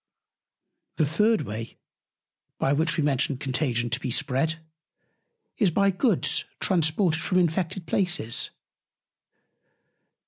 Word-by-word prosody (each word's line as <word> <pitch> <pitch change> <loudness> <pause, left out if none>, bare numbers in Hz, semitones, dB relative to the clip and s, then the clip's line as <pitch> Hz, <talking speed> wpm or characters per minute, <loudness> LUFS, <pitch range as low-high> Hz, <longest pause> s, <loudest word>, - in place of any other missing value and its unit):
The 155 - +2
third 210 +9 +2
Way, 110 +2 -7 0.8
by 135 - +1
which 160 +3 0
we 155 - +1
mentioned 140 -1 0
Contagion 125 -4 -1
to 125 - 0
be 130 - -4
spread, 135 +7 0 1.0
is 205 -5 +4
by 200 +4 +2
Goods 195 - +1
transported 165 -1 +1
from 185 - 0
infected 175 +1 0
Places. 170 - +1
160 Hz, 105 wpm, -25 LUFS, 135-185 Hz, 1.0 s, is